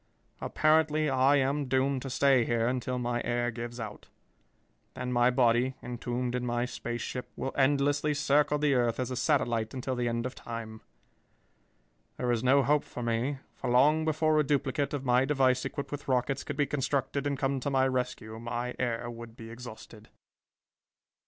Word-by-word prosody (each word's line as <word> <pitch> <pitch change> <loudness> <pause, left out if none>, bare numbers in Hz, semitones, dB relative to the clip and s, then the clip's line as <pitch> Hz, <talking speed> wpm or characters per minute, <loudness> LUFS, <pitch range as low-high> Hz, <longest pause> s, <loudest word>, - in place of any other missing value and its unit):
Apparently 155 -1 +2
I 135 +2 +4
am 140 +1 +1
doomed 130 +1 +1
to 135 - -5
stay 135 -1 +4
here 115 0 +1
until 125 0 -1
my 120 -1 -1
air 120 0 0
gives 120 +1 -6
out. 105 -2 -7 0.9
Then 125 0 -3
my 120 0 +4
body, 125 +1 +2
entombed 125 0 -3
in 125 0 -1
my 120 0 0
space 120 -1 -5
ship, 125 - -5
will 135 - -4
endlessly 145 +2 +2
circle 145 +1 +2
the 145 -1 +2
earth 120 -2 +1
as 130 0 -2
a - - -2
satellite 120 -6 0
until 130 0 -2
the 120 -1 -1
end 115 0 -1
of 130 - -3
time. 115 -3 -7 1.4
There 125 -1 0
is 120 -1 0
no 135 +2 +5
hope 150 +1 +2
for 120 - -7
me, 120 +4 0 0.2
for - - -4
long 145 +6 +4
before 155 0 +2
a - - +4
duplicate 145 +1 0
of 140 -1 -5
my 125 +1 +4
device 130 -2 +2
equipped 140 - -5
with 145 -1 -6
rockets 130 +1 0
could 145 - -5
be 145 - +3
constructed 140 0 -1
and 140 -1 -1
come 135 0 0
to 135 - -2
my 135 -1 +3
rescue, 125 -4 -3
my 120 +1 -3
air 120 -1 -1
would 115 -1 -9
be 115 0 -9
exhausted. 115 -2 -11
130 Hz, 180 wpm, -29 LUFS, 120-140 Hz, 1.4 s, no